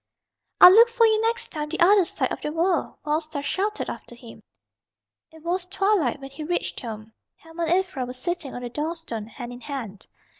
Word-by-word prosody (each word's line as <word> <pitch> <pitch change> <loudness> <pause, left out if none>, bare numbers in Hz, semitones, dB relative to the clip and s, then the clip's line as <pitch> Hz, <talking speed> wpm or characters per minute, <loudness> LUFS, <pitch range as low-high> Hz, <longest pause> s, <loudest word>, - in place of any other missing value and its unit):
"I'll 360 - +11
look 460 +4 +7
for 470 -1 +3
you 435 -1 +3
next 460 +1 -1
time 300 -2 -4
the 335 - -4
other 385 +2 +6
side - - -2
of - - -4
the 300 - -3
world!" 335 +1 0
Wild 305 +1 +1
Star 305 -3 -6
shouted 410 +7 -2
after 240 - -8
him. 235 -1 -13 0.9
It 320 -1 -16
was 355 +1 -2
twilight 380 - +1
when 270 0 -9
he 285 +3 -7
reached 350 +3 -2
home. 220 -2 -8 0.2
Helma 325 +1 -5
and 360 +3 +2
Ivra 275 -9 -5
were 250 - -6
sitting 310 +2 -4
on 245 - -6
the 245 - -4
door 305 +6 -3
stone, 230 -10 -6
hand 240 +1 -8
in 245 - -11
hand. 235 -9 -7
320 Hz, 210 wpm, -24 LUFS, 255-365 Hz, 0.9 s, I'll